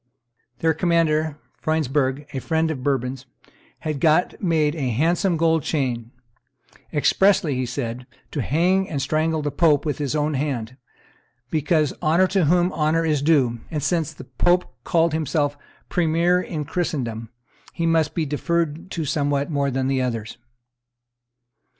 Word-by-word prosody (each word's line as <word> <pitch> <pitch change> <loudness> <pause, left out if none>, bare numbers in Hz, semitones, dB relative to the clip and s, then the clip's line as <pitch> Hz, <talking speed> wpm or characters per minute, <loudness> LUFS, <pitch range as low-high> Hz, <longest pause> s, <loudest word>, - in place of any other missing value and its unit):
Their 160 0 +3
commander, 160 -3 +1 0.2
Freundsberg, 145 -2 0
a 135 - -2
friend 160 +2 0
of 135 -5 -5
Bourbon's, 130 -1 -2 0.5
had 155 -3 -3
got 160 +3 +2
made 160 -5 +2
a 140 -6 -2
handsome 170 - +1
gold 160 0 +2
chain, 125 -7 -2 0.8
"expressly," 170 +1 +3
he 130 -1 -2
said, 125 0 -4 0.2
"to 145 - -2
hang 180 +9 +1
and 145 - -2
strangle 155 +2 0
the 145 - -1
pope 150 -1 +3
with 150 0 -2
his 145 0 -1
own 150 0 0
hand, 130 -4 -2 0.8
because 155 -2 +1
'honor 165 +4 +4
to 190 -4 +2
whom 175 +3 +3
honor 160 +1 +1
is 150 -3 +1
due;' 135 -6 +2
and 150 -3 -3
since 160 0 0
the - - -11
pope 175 +8 +1
called 165 -2 +2
himself 145 -2 0 0.3
premier 175 +1 +2
in 155 -5 -4
Christendom, 120 -10 -3 0.4
he 170 - -2
must 165 -1 +2
be 165 - 0
deferred 160 +3 -1
to 165 -3 -3
somewhat 145 0 0
more 140 -1 +1
than 135 0 0
others." 115 -3 -3
155 Hz, 145 wpm, -23 LUFS, 135-165 Hz, 0.8 s, honor